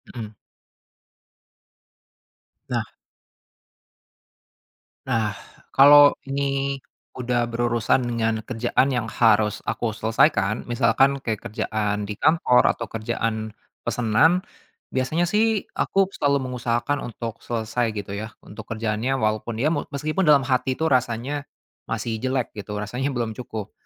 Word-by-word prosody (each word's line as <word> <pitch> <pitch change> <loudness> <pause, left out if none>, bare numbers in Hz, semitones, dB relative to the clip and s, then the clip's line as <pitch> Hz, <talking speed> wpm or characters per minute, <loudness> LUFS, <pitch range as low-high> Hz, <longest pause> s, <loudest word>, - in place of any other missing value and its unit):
Hmm. 110 -3 -5 2.4
Nah. - - 0 2.2
Nah, 110 -4 +1 0.4
kalau 145 +1 +8 0.2
ini 140 0 -1 0.4
udah 125 -1 0
berurusan 120 +1 +1
dengan 115 -2 0
kerjaan 125 +2 +1
yang 125 -3 -1
harus 110 -2 +3
aku 115 - -1
selesaikan 110 -1 +1
misalkan 135 +4 +3
kayak 110 -5 -3
kerjaan 105 -1 -2
di 105 - -4
kantor 155 -5 +4
atau 115 - -5
kerjaan 110 0 -3 0.3
pesenan, 125 - +2 0.5
biasanya 135 +6 0
sih 215 +1 +1
aku 195 -1 +2
selalu 140 -2 +1
mengusahakan 120 +3 -1
untuk 115 -1 -6
selesai 120 +1 -1
gitu 100 -1 -5
ya 110 +1 -5
untuk 110 +1 -11
kerjaannya, 115 +4 -1
walaupun 110 0 -1
ya 155 +5 +2
meskipun 150 +3 -2
dalam 140 -3 +6
hati 130 0 +1
itu 160 - +2
rasanya 130 +2 0 0.4
masih 115 -2 -2
jelek 130 -1 -1
gitu 105 0 -6
rasanya 125 +7 -2
belum 120 -3 -2
cukup. 110 -4 -6
120 Hz, 115 wpm, -23 LUFS, 110-135 Hz, 2.4 s, kalau